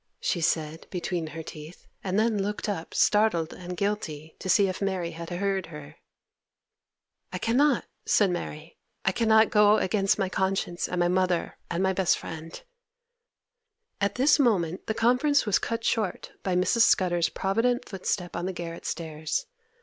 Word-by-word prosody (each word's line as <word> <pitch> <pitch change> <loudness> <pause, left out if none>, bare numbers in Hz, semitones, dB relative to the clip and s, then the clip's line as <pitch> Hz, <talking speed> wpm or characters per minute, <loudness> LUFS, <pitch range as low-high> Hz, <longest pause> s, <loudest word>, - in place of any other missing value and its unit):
she 175 - -1
said, 160 -1 -1
between 175 -2 -3
her 160 +1 -7
teeth, 155 +2 -11 0.2
and 190 0 -1
then 220 -2 +2
looked 205 +2 -3
up, 185 -6 -4
startled 205 -7 +2
and 180 0 -7
guilty, 160 -7 -3
to 185 - -5
see 200 +1 +5
if 185 +1 -4
Mary 185 -4 -1
had 165 +1 -8
heard 190 +1 -1
her. 75 0 -11 1.3
'I 185 - -3
cannot!' 250 +6 +2 0.2
said 200 -3 +3
Mary. 165 -2 -6 0.3
'I 190 - +4
cannot 220 +1 +4
go 210 0 +5
against 195 0 +1
my 195 -2 0
conscience, 190 -2 -1
and 180 - -3
my 175 - +3
mother, 180 -1 0
and 170 +2 -1
my 190 0 +2
best 190 -2 +2
friend—' 160 0 -8 1.4
At 200 - +1
this 280 +4 +4
moment 190 - +1
the 220 - -1
conference 250 +6 +3
was 210 - +2
cut 230 0 -3
short 215 -5 -1
by 185 -2 -1
Mrs. 185 +6 +2
Scudder's 175 -6 +3
provident 230 +6 0
footstep 185 -2 -3
on 175 +2 -2
the 190 - -3
garret 170 -1 -6
stairs. 155 -1 -3
185 Hz, 160 wpm, -27 LUFS, 170-210 Hz, 1.4 s, see